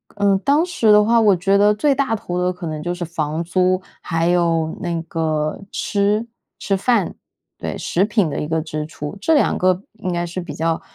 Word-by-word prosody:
嗯， 200 Hz, -1 st, +3 dB
当 290 Hz, +5 st, +3 dB
时 240 Hz, -12 st, +2 dB
的 210 Hz, 0 st, +7 dB
话， 230 Hz, +2 st, +4 dB
我 210 Hz, -4 st, +5 dB
觉 195 Hz, +3 st, +2 dB
得 205 Hz, +1 st, +5 dB
最 280 Hz, +7 st, +2 dB
大 270 Hz, -4 st, 0 dB
头 180 Hz, -4 st, -4 dB
的 180 Hz, 0 st, +1 dB
可 175 Hz, -1 st, -7 dB
能 155 Hz, -1 st, -4 dB
就 175 Hz, +2 st, -2 dB
是 175 Hz, 0 st, -5 dB
房 160 Hz, -1 st, -3 dB
租， 185 Hz, +2 st, +1 dB, 0.2 s
还 165 Hz, -1 st, -1 dB
有 165 Hz, -2 st, +1 dB
那 170 Hz, -2 st, -2 dB
个 155 Hz, -2 st, -2 dB
吃 205 Hz, +2 st, 0 dB, 0.3 s
吃 195 Hz, 0 st, 0 dB
饭， 210 Hz, -2 st, +1 dB, 0.4 s
对， -, -, -5 dB
食 185 Hz, +3 st, +1 dB
品 210 Hz, -5 st, +1 dB
的 -, -, -3 dB
一 150 Hz, -, -3 dB
个 160 Hz, 0 st, 0 dB
支 155 Hz, -1 st, -4 dB
出。 150 Hz, +3 st, -7 dB
这 320 Hz, +11 st, +2 dB
2 295 Hz, -, +3 dB
个 185 Hz, +1 st, +2 dB
应 200 Hz, -5 st, -4 dB
该 175 Hz, 0 st, -1 dB
是 175 Hz, +2 st, -5 dB
比 180 Hz, -, -6 dB
较， 165 Hz, 0 st, -1 dB
180 Hz, 220 characters per minute, -20 LUFS, 165-210 Hz, 0.4 s, 的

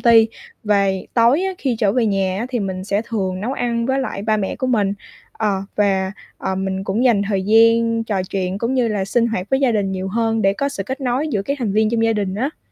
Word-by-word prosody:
ty. 225 Hz, -2 st, +6 dB, 0.4 s
Về 200 Hz, -2 st, +1 dB
tối 240 Hz, +9 st, +4 dB
á 385 Hz, -, -1 dB
khi 255 Hz, -5 st, -1 dB
trở 205 Hz, -4 st, +2 dB
về 240 Hz, -2 st, +2 dB
nhà 195 Hz, -2 st, 0 dB
á 235 Hz, -, -2 dB
thì 250 Hz, -2 st, -2 dB
mình 185 Hz, -1 st, -3 dB
sẽ 200 Hz, +1 st, 0 dB
thường 190 Hz, -5 st, -3 dB
nấu 235 Hz, +6 st, -2 dB
ăn 235 Hz, -3 st, -1 dB
với 265 Hz, +1 st, +1 dB
lại 225 Hz, -6 st, -4 dB
ba 215 Hz, 0 st, +1 dB
mẹ 195 Hz, -2 st, -2 dB
của 260 Hz, -, -2 dB
mình, 210 Hz, -6 st, +1 dB, 0.4 s
ờ, 200 Hz, -3 st, -1 dB
và, 195 Hz, -2 st, +1 dB, 0.3 s
ờ, 190 Hz, -, -2 dB
mình 190 Hz, 0 st, -2 dB
cũng 205 Hz, +6 st, 0 dB
dành 230 Hz, -6 st, +4 dB
thời 195 Hz, -2 st, 0 dB
gian 230 Hz, +2 st, +4 dB
trò 200 Hz, -4 st, -1 dB
chuyện, 190 Hz, 0 st, -2 dB
cũng 240 Hz, +4 st, -1 dB
như 245 Hz, -3 st, +2 dB
là 205 Hz, -3 st, -1 dB
sinh 235 Hz, +4 st, +1 dB
hoạt 195 Hz, -5 st, -2 dB
với 265 Hz, +1 st, +2 dB
gia 260 Hz, -3 st, +3 dB
đình 200 Hz, -3 st, 0 dB
nhiều 190 Hz, 0 st, -3 dB
hơn 225 Hz, +1 st, 0 dB
để 195 Hz, -, +4 dB
có 280 Hz, +7 st, -1 dB
sự 280 Hz, -8 st, -4 dB
kết 265 Hz, +8 st, -5 dB
nối 265 Hz, +4 st, 0 dB
giữa 205 Hz, -8 st, -1 dB
các 280 Hz, +6 st, -3 dB
thành 225 Hz, -6 st, -1 dB
viên 215 Hz, +1 st, +2 dB
trong 230 Hz, -1 st, +1 dB
gia 225 Hz, -, +3 dB
đình 200 Hz, -3 st, -2 dB
á. 265 Hz, +9 st, -3 dB
220 Hz, 255 wpm, -20 LUFS, 195-235 Hz, 0.4 s, ty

